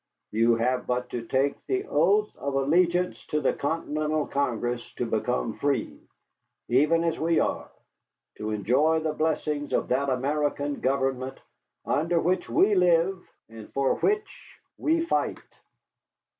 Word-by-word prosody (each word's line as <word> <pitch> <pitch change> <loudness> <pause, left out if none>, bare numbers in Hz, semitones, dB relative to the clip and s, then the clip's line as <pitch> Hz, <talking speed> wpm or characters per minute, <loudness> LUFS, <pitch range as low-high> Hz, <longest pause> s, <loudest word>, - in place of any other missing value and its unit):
You 115 +2 +3
have 125 +2 0
but 125 0 -2
to 115 -1 -5
take 135 +3 0
the 390 +1 -1
oath 200 - +2
of 140 -1 -4
allegiance 175 +6 +2
to 150 - 0
the 135 - +1
Continental 155 0 -1
Congress 120 -3 -2
to - - -2
become 60 -1 -1
free, 140 -4 -1 0.7
even 150 +7 +3
as 165 -1 -1
we 165 +1 +2
are, - - -1 0.7
to 105 - -3
enjoy 130 +10 +2
the 155 -1 -1
blessings 150 -2 -1
of - - 0
that 135 +2 +1
American 145 +2 -1
government 130 0 -1 0.5
under 165 +3 +1
which 180 +3 0
we 205 +2 +4
live 180 0 +3 0.3
and 110 -1 -12
for 135 -1 +2
which 420 +1 -2 0.2
we 330 +2 +2
fight." - - 0
145 Hz, 135 wpm, -26 LUFS, 130-165 Hz, 0.7 s, we